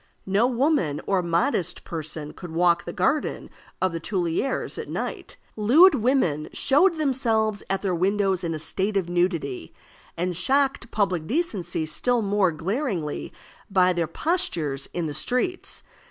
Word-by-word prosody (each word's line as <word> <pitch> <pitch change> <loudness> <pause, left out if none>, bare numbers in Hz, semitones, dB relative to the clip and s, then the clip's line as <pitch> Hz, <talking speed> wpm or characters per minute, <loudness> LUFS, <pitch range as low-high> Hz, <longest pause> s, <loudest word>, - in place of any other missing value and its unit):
No 200 +5 +3
woman 250 - +1
or 195 -2 +2
modest 175 - 0
person 155 -2 -5
could 175 - -9
walk 170 +1 +2
the 170 - -4
garden 280 - -1 0.3
of 185 - +1
the 165 - -4
Tuileries 180 +7 -2
at - - -6
night. - - -5 0.2
Lewd 280 - +6
women 225 - +1
showed 335 +6 +3
themselves 225 -8 +1
at 195 +1 -1
their 190 -2 0
windows 190 +1 +1
in 165 -1 -2
a - - -3
state 195 +6 -1
of 180 -3 -1
nudity, 170 - -1 0.4
and 180 +1 -1
shocked 270 - +1
public 185 -8 0
decency 195 - -1
still 235 +10 +1
more 200 -2 +2
glaringly 180 - -3 0.4
by 185 -2 +4
their 170 -2 -1
postures 165 - -1
in 175 -2 -2
the 150 - -3
streets. 255 - -2
190 Hz, 145 wpm, -25 LUFS, 170-245 Hz, 0.4 s, Lewd